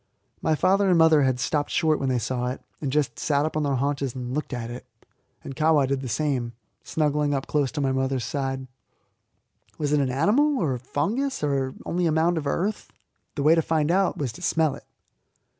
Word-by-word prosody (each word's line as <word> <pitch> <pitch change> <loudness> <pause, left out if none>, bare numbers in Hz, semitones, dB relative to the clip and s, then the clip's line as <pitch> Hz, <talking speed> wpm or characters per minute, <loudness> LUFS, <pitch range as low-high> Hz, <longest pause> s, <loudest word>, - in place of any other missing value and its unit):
My 160 - +2
father 195 +4 +3
and 180 - +4
mother 160 -2 +6
had 130 -2 +1
stopped 145 +4 -1
short 155 -2 +2
when 135 - -1
they 130 - +1
saw 125 +2 -2
it, 125 - -3 0.2
and 140 -3 -2
just 150 0 0
sat 145 -1 +1
up 155 - -3
on 155 - +1
their 140 -2 0
haunches 140 -1 -1
and 125 -1 -5
looked 150 +2 -3
at 120 -2 -4
it; 125 - -7 0.6
and 135 - -7
Kahwa 155 -2 +3
did 135 0 -1
the 130 - -5
same, 125 -2 -1 0.3
snuggling 150 -2 0
up 135 - -2
close 145 -3 0
to 150 - -2
my 135 -1 +1
mother's 130 -2 -1
side. 135 +1 -3 1.1
Was 150 -1 -1
it 150 - +4
an 135 -2 +1
animal, 225 - +2
or 155 - 0
a 125 - -4
fungus, 210 - -2
or 135 -2 0
only 175 0 0
a - - +2
mound 160 +2 +2
of 145 - -5
earth? 200 +9 -2 0.4
The 140 - -2
way 155 +2 +6
to 165 - +3
find 160 0 +1
out 190 +1 +2
was 135 -5 -2
to - - -13
smell 160 -3 +1
it. - - -11
145 Hz, 215 wpm, -25 LUFS, 130-160 Hz, 1.1 s, mother